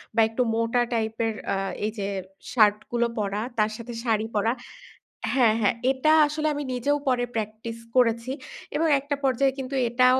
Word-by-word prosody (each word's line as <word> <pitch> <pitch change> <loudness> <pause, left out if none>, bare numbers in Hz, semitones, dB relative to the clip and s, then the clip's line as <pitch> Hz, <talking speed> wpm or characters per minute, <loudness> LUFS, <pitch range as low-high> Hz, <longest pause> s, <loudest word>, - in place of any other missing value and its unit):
বা 230 - +5
একটু 225 +3 -1
মোটা 230 +2 +1
টাইপের 225 0 0 0.2
আ - - +1 0.3
এইযে 210 -2 -3 0.5
শার্ট 210 -3 +5
গুলো 235 0 +2
পরা 205 0 -1 0.2
তার 215 0 +2
সাথে 235 +1 -7
শাড়ি 220 -3 +1
পরা 210 +2 +2 0.8
হ্যাঁ, 235 -5 +4
হ্যাঁ 205 +2 +3 0.2
এটা 270 +4 +2 0.2
আসলে 305 +1 -1
আমি 290 0 -3
নিজেও 280 +4 +1
পরে 250 -2 +2
প্র্যাকটিস 220 +1 -4 0.2
করেছি। 235 0 +3 0.4
এবং 325 +2 +2
একটা 285 +1 -2
পর্যায়ে 270 0 +2
কিন্তু 265 0 -4
এটাও 255 +2 +4
235 Hz, 160 wpm, -25 LUFS, 220-260 Hz, 0.8 s, বা